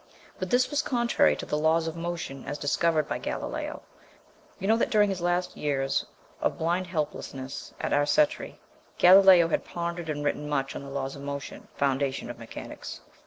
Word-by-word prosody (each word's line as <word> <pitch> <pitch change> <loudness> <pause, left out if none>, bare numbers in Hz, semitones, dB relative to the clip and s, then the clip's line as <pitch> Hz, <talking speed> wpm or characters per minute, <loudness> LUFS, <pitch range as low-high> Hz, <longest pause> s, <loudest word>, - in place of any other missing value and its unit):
But 185 - -3
this 250 +5 +3
was 290 +1 +2
contrary 240 -5 +2
to - - -6
the 150 - -1
laws 160 +1 +2
of 160 - -4
motion 165 -5 -5
as 145 +1 -4
discovered 155 +1 +1
by - - -2
Galileo. - - -4 0.7
You 195 - -4
know 220 +1 +4
that - - +1
during 210 -2 +4
his 185 -2 -4
last 175 +1 0
years 135 -2 -1 0.3
of - - 0
blind 175 +3 0
helplessness 140 -5 -4
at - - -1
Arcetri, 290 - +2 0.4
Galileo 185 -2 +8
had - - 0
pondered 170 -1 -4
and 145 -1 -3
written 150 +1 -1
much 135 -2 -1
on - - -5
the 140 - -9
laws 135 -1 -3
of 140 - -9
motion, 140 0 -6
the - - -28
foundation 135 -2 0
of 120 - -12
mechanics. 115 - -8
160 Hz, 180 wpm, -27 LUFS, 140-180 Hz, 0.7 s, Galileo